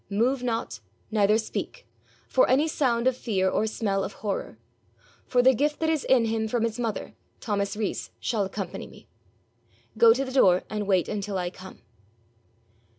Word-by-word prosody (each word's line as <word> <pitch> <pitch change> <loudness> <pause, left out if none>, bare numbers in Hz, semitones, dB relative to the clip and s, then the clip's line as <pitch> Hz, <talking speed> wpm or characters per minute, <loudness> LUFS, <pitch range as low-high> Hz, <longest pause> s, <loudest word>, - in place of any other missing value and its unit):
Move 240 +6 +1
not, 225 - -3 0.3
neither 210 0 +3
speak, 360 - -5 0.4
for - - +3
any 290 +4 +3
sound 250 -6 0
of 260 -1 +3
fear 195 -7 0
or 215 +3 +1
smell 200 -3 -1
of 200 - -5
horror. 200 - -3 0.7
For 245 -1 +3
the 260 +1 +6
gift 295 +4 0
that 320 0 +1
is 310 -4 -1
in 250 -3 +4
him 220 0 -1
from 230 +1 -1
his 230 +1 -2
mother, 230 -3 -3 0.3
Thomas 200 -1 -2
Rees 215 -2 -3
shall 220 -4 0
accompany 190 -1 -5
me. - - -17 0.9
Go 230 -1 +8
to 265 +4 +1
the 260 - -6
door, 185 -9 +4
and 210 -2 -3
wait 185 -3 +2
until 205 -1 -3
I 175 -1 -2
come.' 190 0 -13
220 Hz, 170 wpm, -26 LUFS, 200-250 Hz, 0.9 s, Go